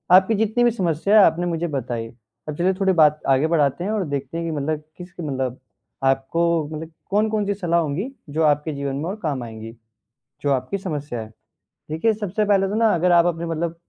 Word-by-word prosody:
आपकी 190 +4 +5
जितनी 220 +3 +1
भी 240 - +5
समस्या 195 0 +2
है 200 - +8
आपने 165 +2 +1
मुझे 170 0 -1
बताई। 120 -5 -3 0.4
अब 150 - -4
चलिए 185 +2 +2
थोड़ी 190 -1 +3
बात 155 -2 +4
आगे 135 +3 +4
बढ़ाते 160 -1 +1
हैं 200 - -1
और 210 -4 0
देखते 140 +3 -4
हैं 170 - -3
कि - - -2
मतलब 150 +2 -2
किस 180 0 -9
मतलब 130 -5 -3 0.4
आपको 135 +5 +1 0.3
मतलब 160 +1 -6 0.2
कौन-कौन-सी 210 0 +1
सलाह 175 -4 +1
होंगी 170 - -2 0.2
जो 160 +3 0
आपके 150 +1 +2
जीवन 140 -1 -3
में 145 +4 -3
और 195 - -3
काम 140 -6 -1
आएँगी, 110 0 -9 0.7
जो 145 - +1
आपकी 130 +8 -1
समस्या 150 -9 -4
है। 110 0 -9 0.6
देखिए, 190 +9 +2
सबसे 210 0 -2
पहले 195 -1 +3
तो 205 - -3
ना 225 -1 +3
अगर 175 +1 +2
आप 170 -1 +6
अपने 170 -1 -1
मतलब 165 0 -2
165 Hz, 205 wpm, -22 LUFS, 145-195 Hz, 0.7 s, है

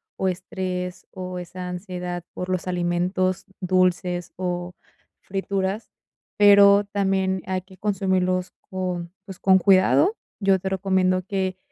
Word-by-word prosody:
o 190 - -1
estrés 180 0 -4
o 185 -1 -6
esa 180 +1 -7
ansiedad 180 -1 -5
por 180 - -5
los 185 0 -2
alimentos 180 +1 0
dulces 180 -1 +1
o 180 -1 -3 0.5
frituras, 195 +2 -3 0.5
pero 200 0 +7
también 190 -2 0
hay 185 0 -2
que 190 0 -18
consumirlos 185 -2 0 0.2
con, 180 -2 -3
pues, 190 -3 -10
con 190 -1 +5
cuidado. 195 - +4 0.2
Yo 195 -2 +3
te 190 - -3
recomiendo 190 -1 +1
que, 190 -2 -1
185 Hz, 125 wpm, -24 LUFS, 180-195 Hz, 0.5 s, pero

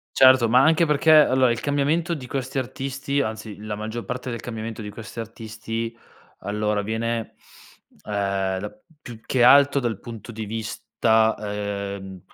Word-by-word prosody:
Certo, 130 -2 +7
ma 125 +3 +5
anche 160 +3 +4
perché 150 0 +2
allora, 130 -5 +6
il 120 0 -1
cambiamento 150 +4 0
di 140 -6 -4
questi 130 +1 -3
artisti 135 +2 -2
anzi 110 -3 -5
la 105 0 -6
maggior 110 +2 -5
parte 125 +1 -5
del 115 -2 -4
cambiamento 115 -1 -6
di 105 - -6
questi 110 +2 -8
artisti, 115 +1 -6 0.4
allora 105 0 -1
avviene, 115 +2 -3 0.7
uhm, 100 -2 -1
da 105 +2 -7 0.2
più 120 -6 -10
che 130 - +1
alto 140 +2 +6
dal 120 -5 -2
punto 115 0 -9
di 110 -1 -6
vista, 110 +1 +1
uhm, 100 -2 -5
115 Hz, 150 wpm, -23 LUFS, 105-130 Hz, 0.7 s, Certo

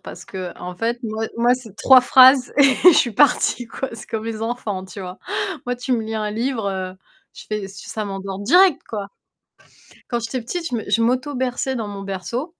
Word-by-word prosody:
parce - - -10
qu'en 180 -1 -7
fait, 230 +5 -2
moi 220 0 -3
moi, 240 +1 +3
c'est 230 -6 -11
3 260 +2 +7
phrases 255 +1 +6
et 285 - +6 0.2
je 360 -3 +9
suis 240 - +3
partie, 250 -2 +2
quoi, 265 +3 -5
c'est 230 - -9
comme 220 -1 -4
les 225 -1 -5
enfants, 225 -4 -3
tu 190 +1 -10
vois? 180 -1 -8 0.5
Moi, 245 - -1
tu 245 +1 -3
me 230 -2 +1
lis 220 0 -5
1 215 -1 -2
livre, 230 +1 -2
heu, 185 -1 -5 0.4
je - - -11
fais 210 -2 -4
ça 200 +2 -6
m'endort 195 0 -5
direct, 350 - +4
quoi. 205 -3 -5 1.0
Quand 240 -1 -1
j'étais 235 +2 -4
petite, 335 +8 -4
je 245 - -2
me 220 - -5
je 230 - +2
m'auto-berçais 255 +1 -1
dans 225 -4 -3
mon 200 -1 -7
berceau 195 - -4
230 Hz, 200 wpm, -21 LUFS, 200-255 Hz, 1.0 s, je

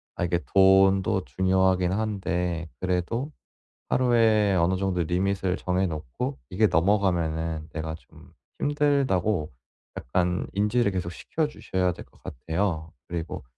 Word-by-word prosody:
아 - - -2
이게 85 0 0
돈도 95 -1 +5
중요하긴 95 -1 +2
한데 90 -5 -2
그래도 95 - -1 0.6
하루에 115 -5 +3
어느 90 +1 +2
정도 95 -2 0
리밋을 95 +2 0
정해 90 +1 0
놓고 80 - -4
이게 105 +3 +3
넘어가면은 85 -4 +1
내가 80 -1 -4
좀 75 -6 -18 0.3
힘들다고 130 - +1 0.6
약간 90 0 +1
인지를 105 +2 +1
계속 90 -2 -3
시켜주셔야 95 - -2
될 - - -11
것 - - -26
같아요. 80 +3 -3 0.2
그리고 85 -1 -5
95 Hz, 275 characters per minute, -26 LUFS, 85-105 Hz, 0.6 s, 돈도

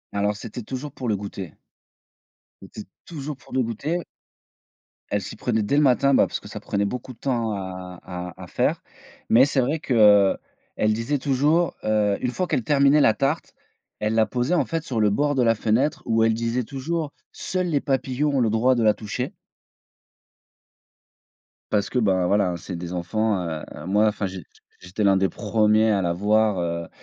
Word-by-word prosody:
Alors 105 +1 +1
c'était 115 +3 -7
toujours 135 +4 -6
pour 125 -5 -4
le 105 - +1
goûter 100 -4 -7 1.1
c'était 95 +2 -9 0.2
toujours 150 -3 -6
pour 125 - -16
le 130 - +2
goûter 150 +10 -3 1.1
elle - - 0
s'y - - -7
prenait 110 -3 -1
dès 140 - 0
le - - +5
matin, 140 +1 +4
bah, - - +5
parce - - -4
que - - -13
ça - - -7
prenait 100 0 -1
beaucoup 125 +4 -5
de - - -23
temps 120 -5 -1
à 90 -2 -6
à 90 0 -7
à - - -9
faire, - - 0 0.5
mais 125 +4 +7
c'est 140 -2 +1
vrai 145 +6 0
qu'elle 105 -7 +5 0.5
disait 115 +6 -1
toujours, 145 +6 +1
heu, 105 -2 +2
une 125 - -1
fois 185 +7 -2
qu'elle 125 - 0
terminait 140 +3 +4
la 110 - +5
tarte, 140 +7 -1 0.5
elle 105 +1 -1
la 110 - +4
posait 125 +8 -1
en - - +2
fait 165 -2 -3
sur 125 -7 -3
le 105 -1 +4
bord 145 +7 +1
de 125 - +2
la 115 -1 +3
fenêtre 115 +7 0
où 115 -1 +2
elle 115 - +3
disait 115 +2 -1
toujours: 145 +5 -3 0.2
«Seuls 185 0 -3
les 150 -5 0
papillons 135 +2 0
ont - - +2
le 115 -3 +2
droit 120 +4 +3
de 120 - +1
la 105 -1 +5
toucher» 105 0 -5 2.4
parce 100 -1 +1
que, 125 - 0
bah, 95 -5 +2
voilà 100 0 +2
hein, 85 - -3
c'est 90 +2 -7
des 85 +1 -6
enfants, 100 +3 0
heu, 80 -2 -4 0.2
moi 105 +3 +3
enfin, 105 -1 -1
j 95 -3 -8 0.4
j'étais 90 +4 -4
le 100 - +5
1 95 - +3
des 95 0 +2
premiers 110 +1 +2
à 100 -2 +2
la 85 - 0
voir, 95 -4 +1
110 Hz, 190 wpm, -24 LUFS, 100-135 Hz, 2.4 s, mais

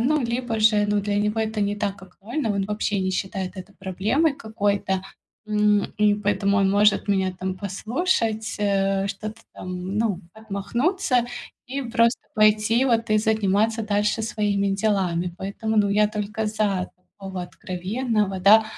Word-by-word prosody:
ну, 295 +5 +2
либо 235 -1 -2
же, 215 -1 +5
ну, 205 0 +2
для 205 0 -1
него 210 +1 0
это 220 -1 -2
не 205 0 0
так 200 -2 -3
актуально, 220 +7 -4
он 200 -1 0
вообще 210 0 -1
не 190 0 0
считает 190 0 -3
это 190 +2 -9
проблемой 210 - +1
какой-то, 200 -4 -1 0.4
м, 210 -1 +3
и 210 -1 +4
поэтому 200 -1 +1
он 195 -1 +3
может 205 +1 +3
меня 190 -2 +1
там 185 0 -2
послушать, 220 - -1
э, 195 -1 +1
что-то 215 +3 -6
там, 185 +2 -5
ну, 210 -5 0
отмахнуться 240 - 0 0.4
и 275 +2 -3
просто 235 -1 +2
пойти 215 +3 +4
вот 230 -2 +1
и 215 - +4
заниматься 220 +1 +1
дальше 210 +1 0
своими 205 -3 0
делами. 190 -4 0
Поэтому, 220 +3 -3
ну, 205 -1 +4
я 210 +1 +3
только 215 +1 -3
за 210 -4 -1
такого 190 0 -8
откровенного, 195 +3 -2
да, 215 +3 +7
210 Hz, 150 wpm, -24 LUFS, 195-220 Hz, 0.4 s, да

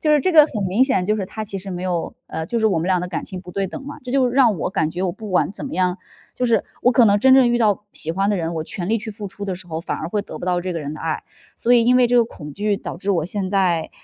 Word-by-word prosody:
就 305 -1 +2
是 295 - +5
这 370 - +1
个 310 -4 +8
很 215 -8 -4
明 225 +8 +4
显， 190 -9 +1
就 215 - +2
是 200 - -2
他 220 - -6
其 200 -2 -6
实 190 +1 -8
没 180 0 -5
有 175 -3 -2
呃， 160 - -4
就 235 - -1
是 220 - +3
我 190 -6 +2
们 165 - -2
俩 185 -1 +2
的 180 - -4
感 175 - -4
情 185 -2 -7
不 180 - -11
对 195 +2 -1
等 275 - -7
嘛， 290 - -7
这 250 - -5
就 260 -2 +3
让 240 -5 +4
我 - - -1
感 160 -6 0
觉 180 - -4
我 185 - +1
不 210 +3 -8
管 185 - +2
怎 230 - -7
么 - - -7
样 180 0 +1 0.4
就 250 - -1
是 230 - +3 0.2
我 250 - +4
可 240 -1 +6
能 205 0 +4
真 265 +4 +6
正 260 -2 +6
遇 240 - +2
到 210 -3 +2
喜 160 - -2
欢 195 +3 0
的 205 - +1
人， 170 -1 -2
我 160 - -1
全 175 +2 -5
力 225 +1 +2
去 220 +1 -7
付 205 0 -7
出 200 +1 -8
的 190 -3 -3
时 185 - -7
候， 160 -2 -4
反 - - -3
而 160 - -5
会 205 +3 -1
得 - - -9
不 - - -6
到 180 -1 +1
这 185 0 -3
个 165 - -3
人 145 -1 -5
的 - - -9
爱。 160 -1 -2 0.3
所 240 - +1
以 240 -1 +6
因 250 +1 +5
为 250 -1 +5
这 245 - 0
个 235 - +5
恐 150 -9 -10
惧 205 +4 0
导 - - -6
致 200 +2 -2
我 170 -5 +1
现 190 +1 -3
在 180 -5 +1
195 Hz, 365 characters per minute, -21 LUFS, 180-230 Hz, 0.4 s, 个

